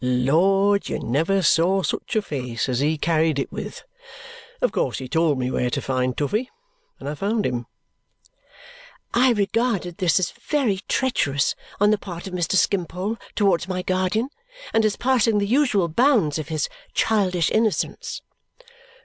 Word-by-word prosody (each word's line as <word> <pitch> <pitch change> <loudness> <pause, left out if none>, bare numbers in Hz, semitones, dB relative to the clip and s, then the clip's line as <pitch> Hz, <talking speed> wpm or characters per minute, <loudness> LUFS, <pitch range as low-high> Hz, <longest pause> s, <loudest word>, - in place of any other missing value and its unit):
Lord, 180 +11 +2
you - - -1
never 165 +10 0
saw 185 +4 +3
such - - -3
a 215 - +2
face 125 -8 -3
as 125 -2 -1
he 155 +3 +1
carried 160 -1 +1
it 135 - -2
with! - - -7 0.8
Of - - +1
course - - -1
he 130 - -6
told 160 0 +2
me 125 0 -1
where 125 - 0
to - - -1
find 130 -1 -1
Toughey, 215 - -1 0.5
and - - -8
I 145 - -2
found 205 +7 -1
him." 120 -2 -2 1.5
I 250 +1 +4
regarded 205 -4 0
this 180 -1 +3
as 185 - -1
very 260 -10 -1
treacherous 145 - +1 0.3
on 205 +1 +4
the 215 - +2
part 175 -4 -8
of 190 - -7
Mr. 175 0 0
Skimpole 190 +3 0 0.2
towards 195 -4 +2
my 185 -1 -3
guardian 185 +7 0 0.4
and 225 -1 +3
as 215 - +1
passing 240 -4 +2
the 200 - +1
usual 225 -6 +2
bounds 190 - +2
of 155 - -5
his 155 -2 -1 0.3
childish 185 -6 +1
innocence. 220 -1 -1
185 Hz, 160 wpm, -23 LUFS, 150-215 Hz, 1.5 s, I